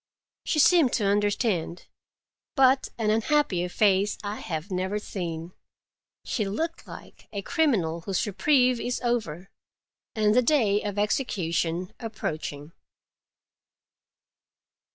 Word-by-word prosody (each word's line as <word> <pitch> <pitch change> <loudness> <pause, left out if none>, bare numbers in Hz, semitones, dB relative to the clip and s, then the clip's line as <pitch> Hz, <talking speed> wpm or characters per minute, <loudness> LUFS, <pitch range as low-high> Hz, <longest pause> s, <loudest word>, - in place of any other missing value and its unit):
She - - 0
seemed 305 -3 +5
to 210 - +1
understand, 205 -4 0 0.7
but 265 -1 +4
an 215 -2 +1
unhappier 215 -6 +1
face 200 +1 +2
I 205 +1 -4
have 165 0 -5
never 190 +2 -1
seen. 170 -4 -5 0.7
She 220 - -1
looked 325 +12 -4
like - - -12
a 200 -2 -5
criminal 205 - +1
whose 190 +4 -1
reprieve 250 +4 +2
is 245 +1 -2
over, 200 -7 -2 0.6
and 210 -1 +3
the 250 - +5
day 230 -6 +2
of 205 -1 -4
execution 180 -6 -1
approaching. 155 - -5
205 Hz, 110 wpm, -26 LUFS, 180-245 Hz, 0.7 s, seemed